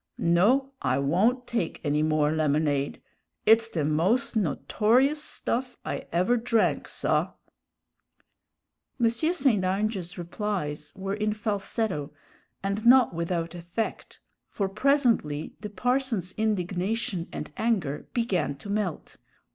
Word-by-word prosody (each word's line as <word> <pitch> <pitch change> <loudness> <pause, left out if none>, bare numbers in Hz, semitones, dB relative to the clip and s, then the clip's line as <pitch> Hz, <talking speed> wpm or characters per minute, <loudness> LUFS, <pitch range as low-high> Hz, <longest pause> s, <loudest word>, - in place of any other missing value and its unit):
No, 225 +11 +3
I 130 0 +1
won't 205 - +2
take 230 -10 -2
any 150 0 +1
more 155 -1 +2
lemonade; 150 -2 0 0.5
it's 225 +1 +5
the 160 -8 -1
most 180 - +1
notorious 235 - +2
stuff 250 -3 -3
I - - -4
ever 185 +9 +2
drank, 230 -1 +1
saw!" - - 0 1.7
M. 230 -1 +4
St. 265 - +2
Ange's 195 -1 -1
replies 175 -5 -3
were 195 +1 -3
in 215 0 0
falsetto 205 -7 -2 0.5
and 200 +2 -2
not 250 -2 +6
without 170 0 -2
effect; 175 +6 -5 0.3
for 200 - -2
presently 220 - +1
the 210 +1 -6
parson's 235 -3 0
indignation 195 -1 -1
and 150 - -6
anger 195 -11 -1
began 190 - 0
to 200 +9 -8
melt. 205 -5 -3
200 Hz, 115 wpm, -27 LUFS, 165-230 Hz, 1.7 s, not